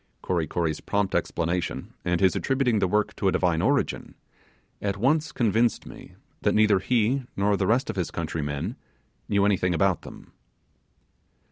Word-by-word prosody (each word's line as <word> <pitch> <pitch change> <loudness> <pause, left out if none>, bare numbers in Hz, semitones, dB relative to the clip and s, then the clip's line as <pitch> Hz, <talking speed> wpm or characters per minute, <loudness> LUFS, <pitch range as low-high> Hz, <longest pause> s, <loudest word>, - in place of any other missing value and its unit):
Kory 85 -4 0
Kory's 80 -1 -2
prompt 100 -2 -1
explanation 85 +1 -2
and 85 0 0
his 95 -3 +4
attributing 130 -5 +1
the 95 - +2
work 105 +3 0
to 100 - 0
a - - +4
divine 85 -3 +1
origin, - - 0 0.7
at 100 -1 -2
once 150 +7 +1
convinced 115 -2 +1
me - - -12 0.3
that - - +1
neither 105 -2 +4
he 125 +5 +1 0.2
nor 100 +1 +2
the 95 -1 0
rest 120 +4 +2
of 110 - -4
his 90 - -1
country 85 -1 -3
men 70 -1 -4 0.5
knew 100 -1 +3
anything 90 -3 +2
about 95 -1 +2
them. - - -12
100 Hz, 160 wpm, -26 LUFS, 90-110 Hz, 0.7 s, his